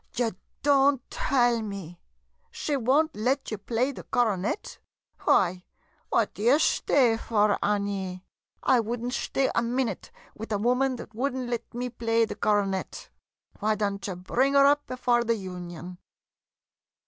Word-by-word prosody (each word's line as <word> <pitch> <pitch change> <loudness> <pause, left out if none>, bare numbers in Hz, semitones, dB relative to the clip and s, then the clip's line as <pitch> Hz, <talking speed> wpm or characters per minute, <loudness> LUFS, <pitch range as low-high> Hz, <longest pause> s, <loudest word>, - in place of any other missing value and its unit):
] - - -24
Ye 235 -2 +1 0.3
don't 275 -2 +3
tell 240 -3 +2
me? 195 -5 -7 0.5
She 295 - -2
won't 280 +5 +2
let 255 +6 -1
you 215 - -3
play 235 +6 0
the - - -9
coronet? 220 - -1 0.5
Why, 180 -1 +3 0.5
what - - +1
d' - - -16
ye 240 +7 +5
shtay 250 -6 +3
for, 210 -3 +1
Annie? 200 -3 -2 0.4
I 255 - +4
would 230 +1 -3
n't 245 - -2
shtay 270 0 0
a - - +2
minute 240 +1 -2 0.2
with 220 +1 -8
a 210 - +1
woman 250 +5 +1
that 235 - -10
would 260 +4 -1
not 255 -2 -4
let 240 -2 -4
me 250 +1 -2
play 230 -1 +1
the - - -5
coro 205 -1 +2
net! 190 -1 -5 0.5
Why 215 +1 +1
don't 200 -2 -2
you 190 - -4
bring 255 +10 0
'er 275 0 +7
up 290 +1 +3
before 245 -1 +1
the 230 0 +1
Union 180 -2 -8
230 Hz, 160 wpm, -27 LUFS, 200-255 Hz, 0.5 s, er